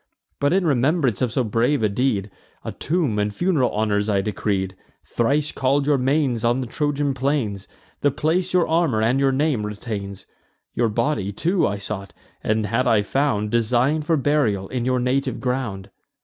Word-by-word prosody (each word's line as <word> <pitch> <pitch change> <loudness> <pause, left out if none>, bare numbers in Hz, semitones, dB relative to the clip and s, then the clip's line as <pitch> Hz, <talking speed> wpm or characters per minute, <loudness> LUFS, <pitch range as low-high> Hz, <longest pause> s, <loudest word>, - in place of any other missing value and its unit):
But, 145 0 +2
in 190 0 +2
remembrance 135 - +1
of 125 -3 +1
so 130 +2 +1
brave 115 +4 +1
a - - +4
deed, 105 -2 -1 0.3
A - - -3
tomb 150 -10 -1
and 105 0 0
fun'ral 155 - +1
honours 105 -1 0
I 100 -2 +2
decreed; 95 -2 -2 0.3
Thrice 140 +6 0
call'd 140 +1 +1
your 145 -2 +2
manes 130 -3 +1
on 120 +2 +2
the 130 - -2
Trojan 145 +2 -1
plains: 130 -7 -1 0.3
The 145 - +3
place 160 +6 0
your 180 -2 +3
armour 160 -9 +1
and 120 +4 +2
your 135 -1 +3
name 135 -4 0
retains. 105 -2 -6 0.5
Your 115 -1 +1
body 110 -3 -1
too 170 - +1
I 100 - -2
sought, 100 -2 -6 0.3
and, 110 0 +1
had 115 +5 0
I 105 -2 +3
found, 105 -4 0
Design'd 125 +7 +1
for 165 -2 +3
burial 130 -9 +1
in 125 -2 -2
your 130 0 +1
native 130 +2 0
ground." 125 -7 -3
125 Hz, 175 wpm, -22 LUFS, 105-145 Hz, 0.5 s, a